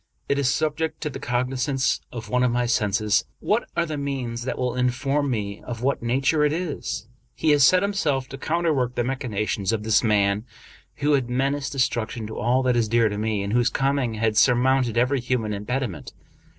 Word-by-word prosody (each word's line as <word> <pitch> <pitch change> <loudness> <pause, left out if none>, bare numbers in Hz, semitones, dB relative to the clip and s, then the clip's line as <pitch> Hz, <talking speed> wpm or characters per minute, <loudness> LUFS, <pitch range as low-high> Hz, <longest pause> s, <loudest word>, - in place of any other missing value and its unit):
It 140 - +1
is 135 -3 +2
subject 155 +3 -1
to 150 - -2
the - - -7
cognizance 130 +2 0
of 115 -2 -7
one 125 +4 +1
of 125 - +3
my 120 +1 0
senses. 105 -2 +1
What 215 +3 0
are 170 - +2
the 155 -3 -4
means 125 -4 -3
that 130 - -3
will 125 -1 -1
inform 135 +3 0
me 105 -4 -3
of 120 -1 -7
what 140 +1 0
nature 135 +6 +1
it 150 - +3
is? 155 - -3 0.3
He 155 - +2
has 145 -2 +5
set 185 +7 +5
himself 155 -10 0
to 135 - -7
counter 165 +2 0
work 125 -3 -1
the 120 - 0
machinations 110 -6 -2
of 110 -2 -2
this 110 +1 +3
man, 105 -2 +2 0.5
who 145 +1 +1
had 130 -4 +1
menaced 135 +3 -1
de - - -7
struction 120 -3 -1
to 110 - -6
all 125 +3 +2
that 125 -1 +2
is 115 -3 +1
dear 115 -1 +3
to 105 - -4
me, 110 -2 -1
and 100 +1 -3
whose 120 0 +3
coming 135 -3 0
had 110 -1 0
surmounted 125 0 +3
every 130 +3 +2
human 120 -3 -1
impediment. 105 - -4
125 Hz, 205 wpm, -24 LUFS, 115-140 Hz, 0.5 s, has